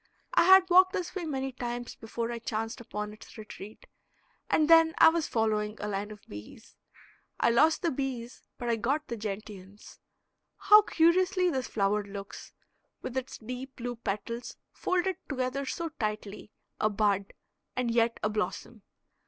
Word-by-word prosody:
I - - +5
had 380 0 +8
walked 370 +1 +7
this 365 -4 -3
way 370 -3 -4
many 270 -3 -3
times 240 -1 -5
before 230 +1 -4
I 235 - -4
chanced 225 +1 -4
upon 210 -2 -5
its 215 - -14
retreat; 215 -1 -10 0.6
and 310 - +3
then 325 0 +6
I - - +8
was 325 -1 -1
following 215 -1 0
a 210 - -3
line 205 0 -3
of 210 -1 -12
bees. 105 - -11 0.6
I 235 - +4
lost 310 +10 +4
the 340 - +2
bees 255 -3 -4 0.2
but 240 - -5
I 230 -1 +1
got 280 +7 -1
the 235 - -2
gentians. 205 -2 -8 0.6
How 420 0 +7
curiously 365 +1 +3
this 260 -4 -2
flower 205 0 +1
looks, 200 0 -9 0.5
with 255 - -5
its 260 0 -4
deep 255 +4 -7
blue 245 0 -4
petals 230 +2 -5 0.2
folded 370 0 0
together 265 0 -2
so 335 +4 -3
tightly 215 -7 -5 0.3
a 215 - +2
bud 200 -2 0 0.4
and 250 -2 0
yet 230 0 +2
a 210 - +2
blossom. 215 +1 -4
235 Hz, 160 wpm, -29 LUFS, 210-305 Hz, 0.6 s, had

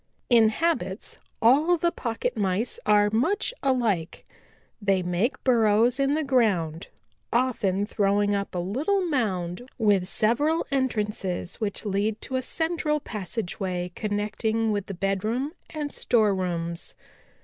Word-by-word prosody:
"In 225 -2 +6
habits 240 - -2 0.2
all 300 +9 +5
the 340 +1 +1
Pocket 245 -1 -3
Mice 205 +2 -1
are 205 0 +4
much 325 - +1
alike. 230 -11 0 0.6
They 195 -2 +2
make 180 +8 -1
burrows 235 0 +3
in 275 +1 +2
the 315 - 0
ground, 195 - +1 0.4
often 210 -6 +1
throwing 205 0 +1
up 200 -2 -2
a - - -1
little 285 - 0
mound 215 - -2
with 205 -5 +2
several 290 +12 +2
entrances 210 -8 -2
which 210 0 -3
lead 205 +2 0
to 260 - -4
a 260 - +1
central 320 +1 -1
passageway 185 -5 -4
connecting 215 +2 -1
with 205 -1 -2
the 195 - -5
bedroom 215 - -1 0.2
and 300 -2 -5
storerooms. 180 -7 0
215 Hz, 125 wpm, -26 LUFS, 195-255 Hz, 0.6 s, In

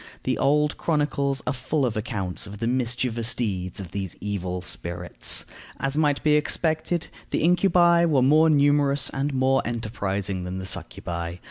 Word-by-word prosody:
The - - -1
old 150 +2 +2
chronicles 140 -3 0
are 125 - 0
full 135 +3 -1
of 120 - -2
accounts 100 -3 -2
of 100 +1 -8
the 115 - -3
mischievous 120 -1 0
deeds 95 -6 -2
of 90 -3 -7
these 95 -3 -4
evil 90 -3 -3
spirits. 85 -1 -1 0.3
As 135 +1 -2
might 150 -2 +1
be 150 - +4
expected, 160 +2 0 0.2
the - - -1
incubi 175 -1 +4
were 145 -6 +3
more 155 +4 +5
numerous 145 -2 +3
and 140 +2 -1
more 135 0 +2
enterprising 100 -5 -3
than 90 +1 -5
the 95 - -5
succubæ. 85 -2 -5
130 Hz, 155 wpm, -25 LUFS, 100-150 Hz, 0.3 s, more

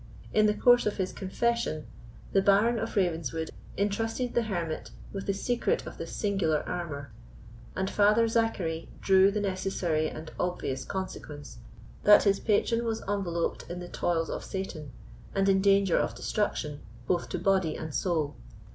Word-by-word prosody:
In 215 0 +5
the 210 - +2
course 245 +2 +5
of 210 - -1
his 190 -1 -2
confession, 220 -4 -1 0.5
the 195 - +4
Baron 210 +4 +4
of 225 - -4
Ravenswood 165 -5 0 0.3
entrusted 225 +5 -1
the 240 - +3
hermit 175 -8 -3 0.2
with 195 -1 -5
the 200 - +2
secret 240 +4 0
of - - -9
this - - -5
singular 190 -7 +1
amour, 145 -7 -5 0.6
and 190 0 -1
Father 210 +3 +4
Zachary 200 -8 0
drew 190 0 +5
the 210 +1 -1
necessary 185 -5 0
and 155 0 -8
obvious 155 -7 -2
consequence 150 -8 -6 0.4
that 210 0 +8
his 200 -1 +3
patron 230 +2 +1
was 225 -1 -2
enveloped 180 -4 -2
in 175 +1 -5
the 175 - -7
toils 165 -2 0
of - - -4
Satan, 165 -7 -5 0.4
and 195 0 +2
in 190 -1 +4
danger 195 -2 +4
of - - -1
destruction, 150 -8 -2 0.3
both 175 +5 0
to - - -2
body 185 -3 +2
and 160 -2 -6
soul. 160 -5 0
190 Hz, 155 wpm, -29 LUFS, 165-210 Hz, 0.6 s, that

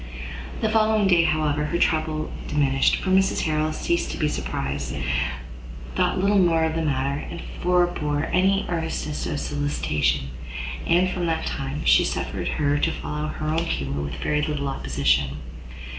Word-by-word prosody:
The 220 - +2
following 215 -1 +3
day, 175 -3 +5
however, 155 -2 +1
her 170 +3 -1
trouble 155 -2 0 0.2
diminished; 135 -2 +3
for 185 - -2
Mrs 190 0 +3
Harrel, 155 0 0
ceasing 170 +2 -1
to - - -4
be 155 - +1
surprised, 70 - -3 1.0
thought - - +1
little 200 +1 +3
more 165 -3 +4
of 160 0 +1
the 165 - -1
matter, 140 -2 0
and 170 - -6 0.2
forbore 175 -4 +1
any 195 +2 +3
earnestness 160 -3 -2
of 145 - -2
solicitation: 75 - -1 0.6
and, 175 +2 +4
from 180 -1 -2
that 160 -1 -1
time, 135 +2 -3
she - - +6
suffered - - -2
her 145 -1 +1
to - - +2
follow 150 0 -4
her 155 0 -4
own 160 +2 +1
humour 70 - -2
with 70 0 -4
very 150 0 0
little 150 -2 -1
opposition. 70 - +1
155 Hz, 160 wpm, -24 LUFS, 140-170 Hz, 1.0 s, she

